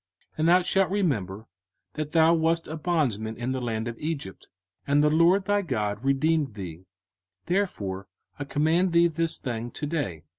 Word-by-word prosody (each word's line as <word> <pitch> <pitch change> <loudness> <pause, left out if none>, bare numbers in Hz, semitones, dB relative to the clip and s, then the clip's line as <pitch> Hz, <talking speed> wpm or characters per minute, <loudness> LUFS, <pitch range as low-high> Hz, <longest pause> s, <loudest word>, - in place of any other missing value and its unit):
05:015:015 - - -19
And 155 - +2
thou 180 +2 +6
shalt 195 +1 +2
remember 110 - -1 0.5
that 155 -1 -4
thou 165 0 +5
wast 165 0 +1
a 155 - -5
bondman 135 - -1
in 125 +2 -3
the 130 -1 -2
land 115 -1 -2
of 115 -1 -6
Egypt, 145 -11 -5 0.4
and 145 +1 +3
the 150 - +4
LORD 175 +5 +4
thy 205 0 +2
God 110 - -2
redeemed 140 -1 +1
thee: 90 -2 -8 0.6
therefore 100 - -2 0.3
I 145 - -3
command 160 +6 +1
thee 170 0 +5
this 165 0 0
thing 120 -2 -4
to 145 - -5
day. 140 - -3
150 Hz, 175 wpm, -26 LUFS, 110-165 Hz, 0.6 s, thou